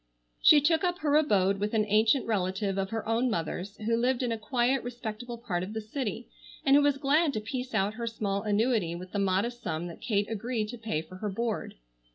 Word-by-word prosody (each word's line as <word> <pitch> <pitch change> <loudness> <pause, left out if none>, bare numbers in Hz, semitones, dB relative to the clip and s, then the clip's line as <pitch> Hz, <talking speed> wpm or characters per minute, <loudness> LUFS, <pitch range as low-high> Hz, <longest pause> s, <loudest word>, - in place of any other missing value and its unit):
She 295 - +8
took 320 +3 +2
up 355 -1 +1
her 295 -1 +2
abode 200 -10 +3
with 210 +2 -1
an 215 -1 +3
ancient 220 +5 +3
relative 195 -1 -1
of 190 0 -1
her 225 0 -4
own 230 +3 +2
mother's, 185 +1 -3
who 225 +2 0
lived 250 +2 +1
in 245 - 0
a 225 - -1
quiet 245 +3 +1
respectable 240 0 -6
part 205 -7 -3
of 190 +4 -5
the 220 - -2
city, 225 0 -4 0.4
and 275 0 +6
who 290 - +6
was 285 -1 +3
glad 290 +2 +2
to 215 - -1
piece 250 +3 -5
out 200 0 +1
her 235 +1 -4
small 200 -3 -2
annuity 210 -4 +1
with 180 +1 -8
the 205 - -2
modest 200 +5 0
sum 160 +2 -3
that 170 - -11
Kate 205 -3 0
agreed 225 0 -2
to 245 - -6
pay 215 -9 -2
for 185 +3 -12
her 210 +2 -3
board. 225 +2 -3
220 Hz, 220 wpm, -29 LUFS, 200-250 Hz, 0.4 s, She